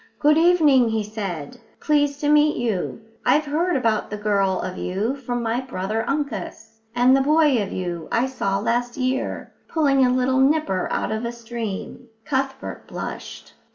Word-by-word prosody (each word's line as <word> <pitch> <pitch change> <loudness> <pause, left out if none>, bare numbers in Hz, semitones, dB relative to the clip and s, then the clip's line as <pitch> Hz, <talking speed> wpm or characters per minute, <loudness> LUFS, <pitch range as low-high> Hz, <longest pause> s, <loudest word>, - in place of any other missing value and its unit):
"Good 300 0 +4
evening," 305 -8 +5
he 220 -1 0
said, 205 -1 -6 0.2
"pleased 290 -1 +1
to 295 - +1
meet 300 0 +4
you. 225 -3 -2 0.2
I've 300 +1 +3
heard 325 +4 0
about 225 -5 0
the 210 - -4
girl 200 -2 +1
of 185 0 -4
you 205 +8 -2
from 245 -3 -4
my 230 +1 0
brother 220 -3 -3
Uncus. 255 -5 -4 0.2
And 250 +2 +5
the 270 - +3
boy 295 -3 +3
of 200 - -4
you 175 -3 -4
I 235 - +2
saw 200 -7 -1
last 240 +4 -1
year, 260 0 -2
pulling 280 -4 +3
a 250 - +4
little 255 +1 +2
nipper 270 -9 +2
out - - -1
of 220 +1 -2
a 235 - -2
stream." 235 0 -6 0.2
Cuthbert 270 -2 -3
blushed. - - -7
245 Hz, 165 wpm, -23 LUFS, 215-280 Hz, 0.2 s, evening